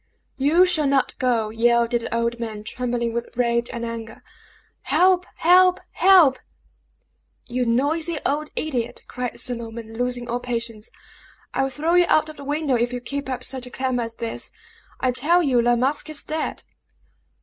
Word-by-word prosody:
"You 315 +7 +5
shall 315 -5 +1
not 275 -1 +1
go!" 230 -4 +1
yelled 235 +1 +2
the 235 -1 -1
old 235 0 -1
man, 220 -3 -5
trembling 240 0 -2
with 235 0 -3
rage 235 -1 +1
and 235 0 -4
anger. 230 -1 -7 0.6
"Help! 365 0 +3
help! 365 +2 +5
help!" 355 -9 +5 1.1
"You 250 0 -2
noisy 310 +7 0
old 295 +2 -1
idiot!" 250 -7 -3
cried 250 -1 -4
Sir 250 - 0
Norman, 230 -1 -8
losing 245 0 -2
all 240 +1 -2
patience, 230 -3 -4 0.6
"I - - +1
will 270 - +1
throw 310 +5 -1
you 355 0 +6
out 310 0 +3
of 310 - -10
the 285 - -9
window 290 0 -1
if 240 0 +1
you 250 - -3
keep 280 +2 -5
up 255 - -3
such 260 -2 -7
a - - -9
clamor 255 -1 -1
as 230 -1 -5
this. 230 -1 -3 0.5
I 255 - +1
tell 330 +8 +3
you 255 -5 +3
La 240 +1 +3
Masque 275 +5 0
is 305 -2 -2
dead!" 315 0 -3
250 Hz, 170 wpm, -23 LUFS, 235-295 Hz, 1.1 s, you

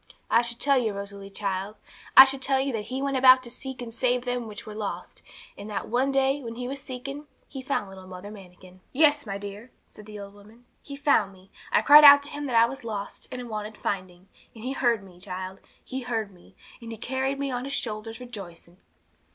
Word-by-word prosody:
I 230 - +6
should 235 0 -4
tell 275 -2 +3
you, 225 -4 -1
Rosalie 200 0 -7
child, 195 0 -3 0.4
I 265 - +13
should 270 0 0
tell 265 0 +2
you 270 0 -1
that 215 -2 -3
He 265 +2 -4
went 275 -1 0
about 255 0 +7
to 240 - -9
seek 260 0 -6
and 230 -1 -8
save 250 +1 0
them 245 -2 -2
which 210 -1 -9
were 215 - -8
lost, 210 -1 -6 0.3
and 205 +1 -9
that 210 - -4
one 255 +4 +1
day, 270 +1 +1
when 230 -3 -7
He 245 +1 -5
was 275 +1 -5
seeking, 275 +2 -7 0.2
He 265 - -8
found 260 -6 -2
little 190 -1 -12
Mother 185 +2 -9
Manikin. 185 -2 -14
'Yes, 290 -2 +3
my 195 -1 -3
dear,' 205 +4 -8 0.2
said 210 - -13
the 210 -1 -9
old 200 0 -9
woman; 215 +4 -18 0.2
'He 280 - -9
found 280 -8 +2
me. 190 0 -20 0.2
I - - +3
cried 300 +1 +9
out 285 0 +10
to 285 - -9
Him 290 -1 -5
that 250 - -2
I 230 0 +7
was 265 +2 -7
lost, 210 -3 -6
and 250 -1 -6
wanted 215 -1 -6
finding; 185 -1 -4 0.3
and 225 - -11
He 255 - -3
heard 235 -6 +1
me, 180 -2 -16
child. 185 0 -7 0.3
He 260 +1 -5
heard 225 -4 -3
me, 175 - -20 0.3
and 230 -1 -8
He 225 - -7
carried 265 +3 -2
me 275 -1 -2
on 245 0 -3
His 275 - -4
shoulders 225 -3 -4
rejoicing.' 185 -8 -10
235 Hz, 225 wpm, -26 LUFS, 200-265 Hz, 0.4 s, I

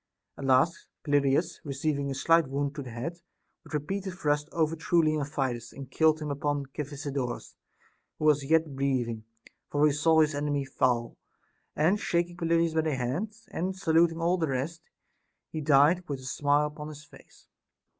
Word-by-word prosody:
At 140 - -7
last 135 +6 +2 0.2
Pelopidas, 145 +3 +1
receiving 140 0 -2
a 135 - -3
slight 165 +2 +3
wound 140 +1 -2
in 140 - -5
the - - -7
head, 135 +9 -5 0.4
with - - -7
repeated 190 +6 -3
thrusts 150 -3 0
overthrew 165 +2 +1
Leontidas, 140 -6 -1
and 135 -1 -10
killed 155 +2 +3
him 150 -1 -4
upon 145 0 -1
Cephisodorus, 140 -3 -4 0.6
who 155 - -3
was 150 -2 +4
yet 160 -3 +2
breathing; 125 -5 -1 0.4
for 145 +1 +3
he 150 - +4
saw 160 +2 +4
his 155 0 +2
enemy 145 -1 -1
fall, 125 -3 0 0.6
and 175 +7 +2
shaking 175 -1 0
Pelopidas 165 -1 +1
by 160 - +2
the 155 -3 -1
hand, 130 - -2 0.2
and 185 +2 -3
saluting 165 -2 +3
all 175 +2 +1
the 160 - +1
rest, 140 +5 -3 0.7
he 155 - -4
died 150 +5 +4
with 140 -2 -3
a. - - -11
smile 145 +3 +2
upon 150 0 -6
his 150 -1 -9
face. 145 - -19
150 Hz, 165 wpm, -28 LUFS, 140-165 Hz, 0.7 s, was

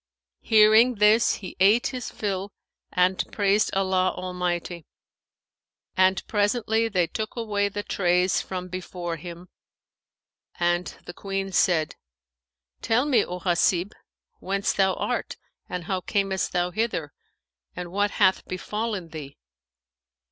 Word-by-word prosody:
Hearing 220 +3 +5
this, 215 +3 +4
he 185 -3 -9
ate 205 +5 +5
his 250 -2 -4
fill 200 -1 -3 0.4
and 180 +1 +2
praised 205 0 +2
Allah 185 -1 +1
Almighty; 180 -2 -3 1.1
and 185 0 +3
presently 220 +1 +1
they 185 -6 +1
took 215 +5 -5
away 205 -4 -1
the 205 +1 -5
trays 180 -1 +1
from 185 -1 -5
before 180 -2 -5
him, 175 +2 -10 1.1
and 175 0 +1 0.2
the 175 - -8
Queen 195 +1 -4
said, 165 -4 +2 0.8
"Tell 245 +4 +2
me, 255 -7 +3
O 180 0 -6
Hasib, 175 +1 +1 0.5
whence 195 +1 -1
thou 190 -1 +2
art - - -3 0.3
and 180 -1 -4
how 185 +2 -2
camest 195 0 -1
thou 180 0 0
hither 225 +4 -2 0.6
and 175 -1 -6
what 205 +2 +1
hath 190 -2 +3
befallen 205 0 -4
thee." 150 -3 -9
190 Hz, 120 wpm, -25 LUFS, 180-210 Hz, 1.1 s, Hearing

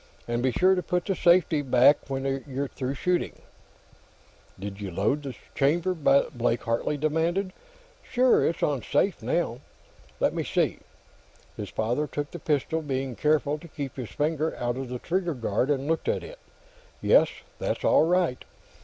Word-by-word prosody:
And 120 0 -1
be 130 +1 +2
sure 185 +9 +4
to 185 - 0
put 180 -1 -1
the 195 - 0
safety 170 -3 +4
back 135 +2 +4
when 135 0 -2
you're 140 +1 -2
through 130 +1 -4
shooting." 180 +5 -1 1.1
"Did 100 +1 -7
you 100 - -4
load 100 - 0
the 135 -3 -6 0.2
chamber?" 165 +6 +2
Blake 135 -7 +2
Hartley 115 +5 -1
demanded. 165 +6 0 0.5
"Sure. 255 0 +3
It's 170 - 0
on 140 -4 +1
safe, 150 - 0
now." 125 0 -1 0.6
"Let - - +2
me - - -2
see." - - 0 0.8
His 105 - -6
father 120 +7 -1
took 145 -1 -4
the 175 - -7
pistol, 155 +1 0
being 135 -3 -3
careful 150 +1 +1
to 170 - -12
keep 145 -4 -6
his 125 -4 -6
finger 155 +1 -1
out 120 0 -2
of 130 -1 -5
the 125 - -3
trigger 175 +3 -1
guard, 120 +2 0
and 140 -2 0
looked 165 +1 0
at - - 0
it. - - -10 0.6
"Yes, - - +5 0.3
that's - - -2
all 160 - +5
right." 175 -7 +1
145 Hz, 165 wpm, -27 LUFS, 125-165 Hz, 1.1 s, Yes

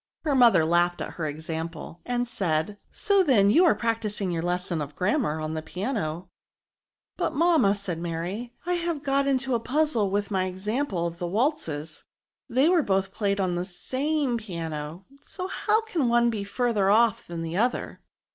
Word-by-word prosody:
Her 300 - +1
mother 240 -11 +6
laughed 175 +1 +2
at - - -4
her 160 -3 -4
example; 160 +2 -6
and 245 0 0
said, 190 -2 -1
So, 400 -2 +2
then, 220 - +4
you 345 +11 +6
are 335 - +5
practising 215 -4 -1
your 165 -1 -1
lesson 175 -1 -1
of 145 0 -6
grammar 185 - 0
on 155 0 -3
the 160 - -3
piano. 180 - -3 0.4
" - - -61
But, - - -1
mamma," 315 - +4
said 190 -5 -4
Mary, 175 +8 -4
" - - -32
I 360 - 0
have 340 -4 -2
got 275 0 +1
into 265 -1 +1
a 235 - +2
puzzle 250 -4 +1
with 205 +1 -1
my 190 -2 +1
example 190 +1 -2
of 170 0 -5
the 175 - -2
waltzes. 170 - -1 0.5
They 260 +5 +3
were 350 -1 +4
both 195 -5 0
played 200 -2 0
on 185 -2 +1
the 175 0 -1
same 260 - -1
piano, 165 -3 -6 0.2
so 370 - -6
how 430 +3 +1
can 345 - -1
one 235 0 +4
be 210 -3 -3
further 205 -1 +1
off 225 +1 +3
than 170 -1 -5
the 165 +2 -3
other?" 240 +4 -1
200 Hz, 185 wpm, -26 LUFS, 175-260 Hz, 0.5 s, mother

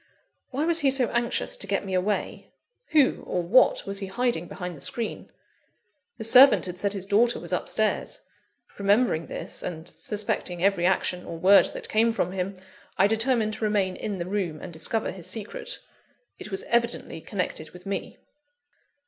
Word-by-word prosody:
Why 280 +4 -1
was 335 0 +2
he 285 -4 +3
so 260 -3 +1
anxious 240 0 0
to 200 - -1
get 200 0 -1
me 190 - -4
away? 190 +3 -1 0.4
Who, 295 -4 +3
or 180 - -2
what, 205 +10 +4
was 195 0 -2
he 195 - -5
hiding 215 -4 -1
behind 180 -1 -6
the 145 - -12
screen? 235 -2 -4 0.9
The 220 - -6
servant 255 +5 +7
had 180 0 -6
said 200 +1 0
his 195 -2 -2
daughter 220 +4 +3
was - - -6
upstairs; - - 0 0.6
remembering 200 -4 +2
this, - - -4
and 165 -1 -6
suspecting 205 -4 -3
every 195 -3 +3
action 180 -1 0
or 165 - -7
word 190 +4 +6
that - - -6
came 225 +2 +3
from 180 -6 -1
him, 190 +1 -3 0.4
I 195 - +5
determined 220 0 +1
to 220 - -6
remain 200 -3 +1
in 205 -2 -4
the 170 - -3
room, 185 -5 -2
and 175 - -9
discover 190 +8 -1
his 180 -2 -9
secret. 210 +2 -5 0.6
It - - -8
was 190 -2 -2
evidently 235 -8 -1
connected 175 -5 -4
with 180 +2 -14
me. 195 -1 -4
200 Hz, 175 wpm, -26 LUFS, 180-225 Hz, 0.9 s, servant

